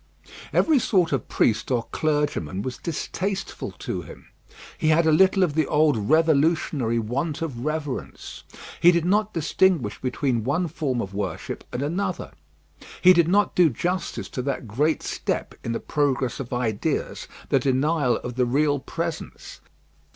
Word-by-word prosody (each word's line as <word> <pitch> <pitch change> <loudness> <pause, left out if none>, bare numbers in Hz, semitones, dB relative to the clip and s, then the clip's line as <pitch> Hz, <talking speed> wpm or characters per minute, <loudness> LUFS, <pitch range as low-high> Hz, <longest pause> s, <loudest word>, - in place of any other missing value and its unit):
Every 310 -4 +4
sort 185 -7 +2
of 135 -4 -1
priest 110 - +1
or 120 -3 +1
clergyman 145 - -1
was 130 -1 -5
distasteful 190 +4 -4
to - - -5
him. - - -13 0.5
He 155 - -1
had 160 +1 +4
a 160 - +4
little 190 +4 +5
of 165 -5 +1
the 155 -1 +1
old 150 -1 +3
revolutionary 155 -6 +2
want 135 +8 -2
of 125 -7 -5
reverence. 155 -3 -4 0.4
He 175 - +8
did 170 -1 +1
not 210 +3 +2
distinguish 165 - +1
between 125 -2 -1
one 160 +9 0
form 135 -6 -2
of 95 - -6
worship 100 -4 -4
and 125 - -3
another. 175 +7 -2 0.7
He 185 0 +7
did 170 -2 +4
not 200 +2 +2
do 175 -3 +5
justice 175 +9 -3
to 130 - -4
that 130 -2 -3
great 145 +9 0
step - - -3
in 115 - -3
the 115 - -2
progress 135 -5 -1
of 130 -3 -6
ideas, 120 -4 -2 0.2
the 135 - +4
denial 135 +1 +1
of 125 0 -6
the 125 -1 +2
real 145 +3 +2
presence. 165 +4 -6
150 Hz, 155 wpm, -24 LUFS, 125-170 Hz, 0.7 s, He